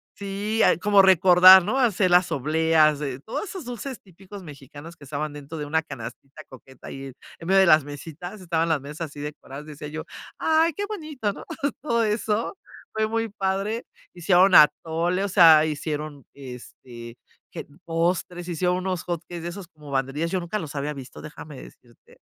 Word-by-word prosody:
si 205 +2 -3
hay - - +4
como 205 +1 +5
recordar, 185 0 +8
¿no? 215 +7 -1
Hacer 210 -7 +2
las 180 0 +4
obleas 155 +1 +2
de 140 -3 -4
todos 225 - -6
esos 370 -7 -8
dulces 245 +2 -7
típicos 195 +1 -13
mexicanos 145 +2 -12
que 155 - -18
estaban 145 +2 -5
dentro 145 +2 -9
de 150 - -4
una 160 +2 0
canastita 135 0 -10
coqueta, 130 0 -15
ahí 135 0 -8 0.3
en 165 - -9
medio 195 +1 +4
de 190 - +6
las 155 -3 +5
mesitas, 160 +7 -9
estaban 170 -2 -1
las 160 -2 +1
mesas 150 +4 -10
así 145 - -12
decoradas, 145 -1 -8
decía 150 0 -9
yo: 160 +1 -7 0.3
"Ay, 320 +1 +2
qué 410 - -4
bonito", 305 - -4
¿no? - - -10 0.4
Todo 235 -5 0
eso 215 - -2 0.4
fue 220 0 0
muy 225 +1 -2
padre. 200 +3 -2 0.3
Hicieron 180 +1 +3
atole, 165 +4 +3
o - - -3
sea, 165 -5 +7
hicieron, 150 -2 -5
este, 125 -2 -11 0.4
que - - -7 0.2
postres, 175 +1 -2
hicieron 180 +2 0
unos 185 -1 -3
hot 170 -2 -4
cakes 175 -1 -7
de 175 - -4
esos 180 0 -9
como 150 -4 -14
banderillas, 135 +5 -2
yo 185 - 0
nunca 175 +4 -4
los 160 -5 -7
había 145 +1 -3
visto, 135 -2 -11
déjame 150 -2 -10
decirte. 120 -1 -18
170 Hz, 175 wpm, -24 LUFS, 150-195 Hz, 0.4 s, recordar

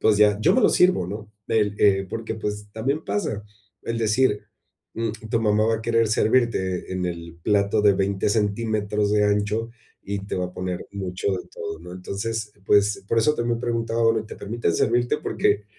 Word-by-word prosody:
pues, 110 - +4
ya, 105 -1 +5
yo - - +4
me 255 - +4
lo - - +5
sirvo, 180 - +3
¿no? 105 +3 -7 0.2
El, 105 -2 +2
eh, 95 -1 +4
porque, 110 +2 -4
pues, 105 -1 -4
también 135 +8 -2
pasa 105 +1 -2 0.4
el 115 0 -3
decir, 110 0 +1 0.5
mm, 115 -1 -1 0.2
tu 115 - +2
mamá 105 -1 +3
va 115 - +2
a 110 - -7
querer 115 0 +2
servirte 110 -6 +1
en 90 -1 -1
el 85 -1 -6
plato 105 +1 +2
de 100 -1 +5
20 95 +1 0
centímetros 105 -1 0
de 105 0 +3
ancho 105 +2 0 0.3
y 100 0 -3
te - - -3
va 90 0 -1
a 90 - -11
poner 90 -1 -4
mucho 95 0 -2
de 90 -1 -4
todo, 80 - -6
¿no? 90 +1 -10
Entonces, 105 +4 -4
pues, 100 0 +3
por 115 - +2
eso 150 +7 +3
también 120 -2 -1
preguntaba 115 -1 -1
ahora 115 -1 +3
y - - -9
te - - -9
permiten 105 -5 -1
servirte, 120 +1 +2
porque 105 - 0
105 Hz, 195 wpm, -24 LUFS, 100-115 Hz, 0.5 s, ya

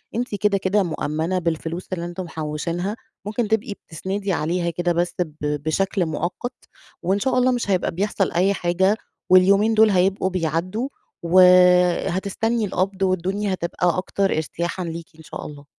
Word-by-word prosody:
أنتِ 240 -2 -2
كده، 205 -1 +2
كده 195 +1 +1
مؤمّنة 160 +2 -2
بالفلوس 165 +1 -3
اللي 170 -1 -3
إنتم 175 +2 -5
محوشينها، 170 +5 -3 0.3
ممكن 215 +2 -1
تبقي 220 0 0
بتسندي 190 +3 -4
عليها 170 +2 0
كده 175 +1 -1
بس 175 +1 -1
ب 160 -4 -2 0.3
بشكل 185 +3 0
مؤقَّت، 175 - -3 0.5
وإن 190 +3 +1
شاء 255 +4 0
الله 255 +1 +4
مش 240 -4 -2
هيبقى 185 - +1
بيحصل 195 +2 -1
أي 185 +3 +2
حاجة، 190 +3 +1 0.3
واليومين 200 +4 +5
دُول 220 0 +6
هيبقوا 190 0 +2
بيعدّوا 185 - -2 0.3
وهتستني 180 +5 +4
القبض 190 0 -2
والدنيا 190 +2 0
هتبقى 175 0 0
أكتر 195 +2 -1
إرتياحًا 170 +3 -3
ليكِ 165 0 -6
إن 160 - -14
شاء - - -8
الله. 145 -1 -10
185 Hz, 150 wpm, -22 LUFS, 170-200 Hz, 0.5 s, دُول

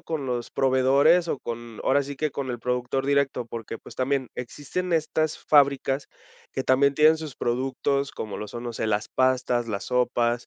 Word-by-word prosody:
con 155 -4 -4
los 120 -2 -3
proveedores 135 +6 +4
o 140 - -1
con, 120 -2 -7
ahora 140 +2 +3
sí 140 0 -7
que, 155 +2 -1
con 135 -1 -4
el 120 - -3
productor 125 +2 -1
directo? 140 -3 +1
Porque, 115 -1 -6
pues, - - -13
también 130 -1 0
existen 145 +8 -4
estas 155 -1 0
fábricas 140 -1 +3 0.5
que 130 - -2
también 140 +2 +4
tienen 155 +2 +5
sus 155 -5 -7
productos, 135 +3 -1
como 110 - -6
lo 105 - -6
son, 120 - -7
no 120 - -4
sé, 110 - -2
las 105 -1 0
pastas, 125 -2 +1
las 100 -3 -3
sopas, 120 -1 0
130 Hz, 185 wpm, -25 LUFS, 120-140 Hz, 0.5 s, tienen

